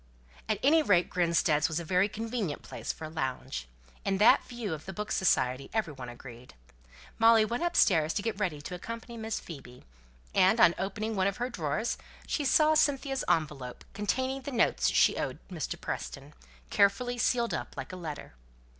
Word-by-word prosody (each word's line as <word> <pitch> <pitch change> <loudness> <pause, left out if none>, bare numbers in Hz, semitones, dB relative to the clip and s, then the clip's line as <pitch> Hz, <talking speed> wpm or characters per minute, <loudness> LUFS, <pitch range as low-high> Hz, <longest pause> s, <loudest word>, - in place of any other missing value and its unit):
At 215 - +2
any 315 +4 +5
rate, 185 - +2
Grinstead's 165 -4 +2
was 160 0 -2
a - - -5
very 185 +4 +2
convenient 220 -6 -3
place - - -5
for 160 - -8
a - - -6
lounge. 130 - -4 0.4
In 195 -1 0
that 210 - +6
view 235 -7 -5
of 155 +2 -8
the 190 - -5
Book 210 +3 -5
Society 130 -9 +1
every 200 -9 0
one 130 -3 -8
agreed. 120 - -12 0.6
Molly 225 -1 +6
went 235 +5 -3
upstairs 185 - +3
to 200 - -1
get 220 -2 -2
ready 170 -8 -1
to 180 - -6
accompany 230 +6 -7
Miss 220 -1 -3
Phoebe; 130 -6 -11 0.5
and 195 +5 +4
on 170 - +7
opening 215 +3 -3
one 190 -1 +2
of 200 - -2
her 245 +1 -2
drawers 160 +3 -2 0.3
she 300 - -1
saw 305 +4 +4
Cynthia's 275 -3 +1
envelope, 140 -6 -1
containing 260 +7 -1
the 280 - -6
money 235 -3 +3
she - - +3
owed - - -3
to - - -10
Mr. - - -4
Preston, - - -6 0.4
carefully 245 +5 +2
sealed 235 0 +1
up - - -5
like - - -6
a - - -4
letter. 160 - -7
195 Hz, 180 wpm, -29 LUFS, 155-230 Hz, 0.6 s, on